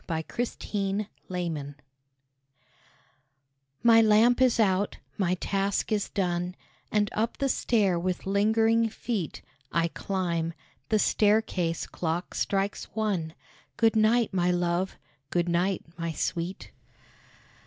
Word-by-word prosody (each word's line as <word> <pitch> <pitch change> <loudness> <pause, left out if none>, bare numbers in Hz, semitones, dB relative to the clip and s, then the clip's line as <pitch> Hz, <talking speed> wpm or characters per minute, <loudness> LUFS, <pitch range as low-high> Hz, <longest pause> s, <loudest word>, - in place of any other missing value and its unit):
A - - 0
LATE 160 0 -3 0.3
GOOD 200 0 -2 0.2
NIGHT 160 -6 -3 2.1
My 230 -1 +7
lamp 225 +3 +5
is 255 -2 +4
out, 200 -2 +2 0.2
my 185 -2 +1
task 195 +3 -1
is 210 -2 0
done, 180 -2 -1 0.4
And 205 -1 +1
up 225 +2 -1
the 275 - +1
stair 205 -9 +2
with 180 +1 -2
lingering 220 +3 +3
feet 210 -6 -4 0.3
I 170 0 +1
climb. 170 -3 -2 0.3
The 220 - +3
staircase 205 -6 +2
clock 170 +1 -3
strikes 195 0 -1
one. 190 -8 -1 0.4
Good 225 -1 +3
night, 220 0 +3
my 180 -1 +2
love! 175 +1 0 0.3
good 175 0 0
night, 175 +2 +1 0.2
my 165 -1 -2
sweet! 170 +4 -3
195 Hz, 115 wpm, -27 LUFS, 175-215 Hz, 2.1 s, My